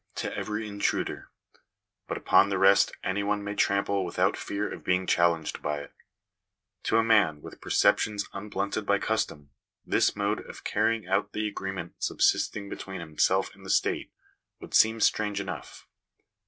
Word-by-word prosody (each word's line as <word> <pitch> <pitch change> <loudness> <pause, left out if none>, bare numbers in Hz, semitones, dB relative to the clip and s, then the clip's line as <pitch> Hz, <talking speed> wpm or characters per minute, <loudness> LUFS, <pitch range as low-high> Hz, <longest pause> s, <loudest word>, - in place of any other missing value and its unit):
to - - -3
every 105 +1 -3
intruder; 100 -1 -2 0.8
but - - -3
upon 100 - +4
the 100 - 0
rest 100 +1 +5
any 95 +2 -1
one 105 0 -1
may 100 0 -4
trample 100 -1 +1
without - - +1
fear 100 +1 -3
of - - -8
being 90 +1 +1
challenged 85 -3 +1
by 75 0 -2
it 70 - -11 0.9
To 110 - +3
a 115 - +4
man 105 -9 +3
with - - -11
perceptions 105 -2 +2
unblunted 100 +1 -3
by 100 0 +2
custom, 80 -10 -2 0.3
this - - +2
mode - - 0
of - - -10
carrying 115 -4 0
out 95 +2 0
the 105 0 -1
agreement 95 -4 -6
subsisting 100 -1 +1
between 95 -1 -7
himself 85 +4 +1
and 100 - -17
the 95 - -9
state, - - +1 0.5
would - - -11
seem 110 0 +4
strange 105 -2 +2
enough. 100 -1 -7
100 Hz, 155 wpm, -28 LUFS, 95-105 Hz, 0.9 s, rest